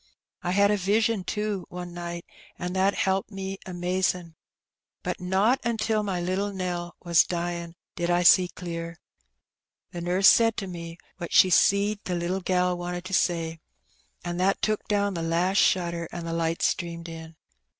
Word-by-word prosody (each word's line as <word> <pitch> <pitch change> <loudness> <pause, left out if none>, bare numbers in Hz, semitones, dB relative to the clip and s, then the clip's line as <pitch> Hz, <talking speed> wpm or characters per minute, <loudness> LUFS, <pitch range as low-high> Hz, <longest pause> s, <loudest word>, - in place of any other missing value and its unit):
I - - -3
had 200 +1 +4
a 210 - +2
vision^ 210 +2 +1
too^ 210 -1 -2
one 180 -1 -7
night, 170 0 -6 0.3
an' 180 0 -4
that 190 +1 +2
helped 190 0 0
me 195 -1 -5
amazin'. 180 -1 -1 0.7
But - - -3
not 195 +8 +2
until 225 -2 0
my 195 -4 -2
little 185 +3 -1
Nell 175 -2 -4
was 170 -2 +5
dyin' 170 -1 -4 0.2
did 175 -1 -2
I 175 0 +3
see 180 +1 +7
clear. 170 -1 -6 0.9
The 175 - -6
nurse 180 +3 +3
said 225 -1 +5
to 195 - -3
me 170 -2 -7 0.2
what 170 - -5
she 185 - +6
seed 200 +3 +3
the 180 - -2
little 175 +2 -2
gal 180 0 +1
wanted 175 0 -5
to 190 - -6
say, 165 -3 0 0.7
an' 175 0 -3
that 190 +2 +1
took 215 +1 0
down 205 -1 +1
the 170 - -3
last 170 +4 +1
shutter, 170 -2 +1
an' 170 -1 -6
the 165 - -3
light 165 0 -1
streamed 170 -1 -1
in. 160 -1 -9
180 Hz, 170 wpm, -26 LUFS, 170-195 Hz, 0.9 s, see